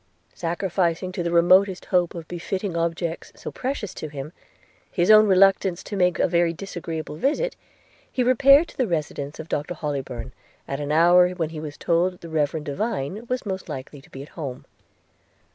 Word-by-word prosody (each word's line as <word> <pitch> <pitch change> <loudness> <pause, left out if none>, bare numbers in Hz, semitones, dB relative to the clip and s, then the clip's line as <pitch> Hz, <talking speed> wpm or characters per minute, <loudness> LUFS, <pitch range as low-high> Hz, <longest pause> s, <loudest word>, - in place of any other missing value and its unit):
Sacrificing 175 +1 -1
to 185 - -4
the 170 - -1
remotest 185 +3 +4
hope 180 -1 +2
of 165 -2 -7
benefiting 185 +2 -4
objects, 170 0 -2
so - - -7
precious 250 -7 -4
to 155 - -6
him, 145 +2 -7 0.6
his 175 +3 +3
own 215 0 +8
reluctance 190 -2 +4
to 205 - -6
make 180 -2 +2
a - - +3
very 170 -1 +2
disagreeable 165 -4 -6
visit, 305 - 0 0.6
he 255 - 0
repaired 275 +5 +6
to - - -16
the 255 - +1
residence 150 -4 -3
of 160 - -7
Dr 150 +4 -3
Hollybourn, 135 -6 -4 0.4
at 135 - -3
an 145 0 -3
hour 175 +3 +6
when 165 -4 -2
he 160 -1 -7
was 150 -1 -7
told 175 +2 0
the 170 - -9
reverend 155 0 -1
Divine 205 - -3
was 250 0 -2
most 190 -2 -4
likely 135 +2 -7
to - - -20
be 135 - -8
at 145 - -13
home. 135 -6 -7
170 Hz, 180 wpm, -24 LUFS, 155-195 Hz, 0.6 s, own